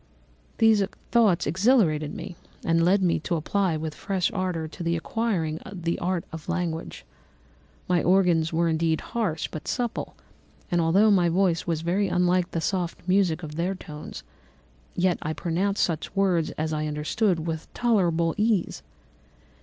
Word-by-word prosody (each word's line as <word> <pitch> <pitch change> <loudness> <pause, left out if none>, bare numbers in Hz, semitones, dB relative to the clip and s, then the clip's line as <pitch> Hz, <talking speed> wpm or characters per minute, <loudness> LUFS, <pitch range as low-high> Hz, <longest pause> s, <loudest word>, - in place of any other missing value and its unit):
"These 220 -2 +5 0.3
thoughts 220 -8 +4
exhilarated 165 - +2
me 180 0 -7 0.3
and 165 0 +3
led 190 +3 +3
me 170 -2 +2
to 170 - -2
apply 170 +1 0
with 155 0 -4
fresh 190 +1 -1
ardour 180 -5 -2
to 155 - -11
the 170 0 0
acquiring 170 -4 -1
the 170 -3 -3
art 180 -1 -1
of 160 +1 -8
language. 170 -2 -3 0.8
My 180 -1 +2
organs 175 -3 +3
were 170 +1 +1
indeed 160 0 +1
harsh, 210 -9 -1
but 155 - -7
supple; 240 -2 -3 0.6
and 175 -1 +2
although 195 +7 +4
my 180 -4 +4
voice 175 -1 +1
was 165 -2 -1
very 185 +4 +1
unlike 180 0 +2
the 165 - -3
soft 175 0 -2
music 180 -3 +2
of 150 0 -7
their 180 +3 -1
tones, 150 -4 -9 0.7
yet 180 0 +1
I 155 - -2
pronounced 185 +5 0
such 165 +2 -2
words 185 -5 +2
as 155 0 -1
I 155 0 -1
understood 160 +4 0
with 160 -1 -4
tolerable 175 -9 +2
ease. 210 -4 +1
175 Hz, 155 wpm, -25 LUFS, 160-195 Hz, 0.8 s, These